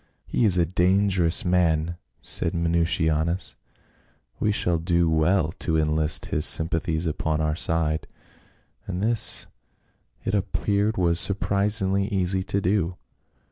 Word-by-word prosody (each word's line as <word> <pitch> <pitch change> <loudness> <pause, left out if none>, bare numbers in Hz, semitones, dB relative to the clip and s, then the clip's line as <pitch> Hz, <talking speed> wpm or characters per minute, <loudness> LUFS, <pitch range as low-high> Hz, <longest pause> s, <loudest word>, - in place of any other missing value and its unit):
"He 120 - 0
is 95 -4 +4
a 85 - +3
dangerous 90 0 +1
man," 85 -2 +1 0.3
said 85 - 0
Minucianus; 85 0 -1 0.8
"we 105 - +1
shall 90 -5 -1
do 85 0 +1
well 80 +1 +1
to 80 -1 -1
enlist 75 0 0
his - - -2
sympathies 80 0 +2
upon 80 0 -2
our 75 -1 -1
side." 80 -2 -1 0.8
And 95 0 -4
this 115 0 +4 0.8
it 95 - -2
appeared 100 +1 -1
was 85 -2 +1
surprisingly 100 0 +1
easy 95 -1 0
to 100 - -1
do. 90 -2 -1
85 Hz, 120 wpm, -24 LUFS, 80-95 Hz, 0.8 s, is